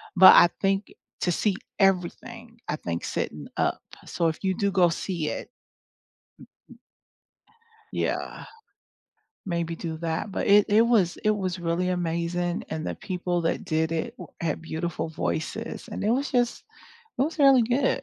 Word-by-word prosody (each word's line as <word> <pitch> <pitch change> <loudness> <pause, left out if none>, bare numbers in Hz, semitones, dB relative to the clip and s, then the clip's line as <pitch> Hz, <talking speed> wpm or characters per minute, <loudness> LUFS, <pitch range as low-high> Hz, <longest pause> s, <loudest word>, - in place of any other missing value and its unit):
but 190 +1 +10
I 175 - +8
think 195 +1 0 0.3
to 175 - +1
see 195 +3 +1 0.2
everything 205 +5 -1
I - - -1
think 85 - -4
sitting - - -3
up - - 0 0.3
So 170 - 0
if 160 - -7
you 190 -1 +1
do 200 -1 +1
go 180 -3 +4
see 170 -2 -2
it - - -5 2.5
Yeah, - - -2 1.0
maybe 170 -2 -2
do 160 -1 -5
that, 165 +5 -3
but - - -2
it 205 0 +6
it 215 +2 +5
was 220 -7 +3
it 215 -1 +1
was 185 -2 -3
really 175 +2 0
amazing, 175 0 -1
and 155 0 -4
the - - -3
people 180 -2 -2
that 165 - -1
did 160 +1 0
it 195 +9 -2
w - - -9
had 165 -2 -1
beautiful 160 0 -3
voices 160 +10 -4
and 215 - -5
it 215 - +2
was 275 +4 0
just, 245 -2 +1 0.6
it - - +4
was 315 +2 -2
really 270 -4 +7
good. 250 +4 +1
180 Hz, 155 wpm, -26 LUFS, 165-215 Hz, 2.5 s, but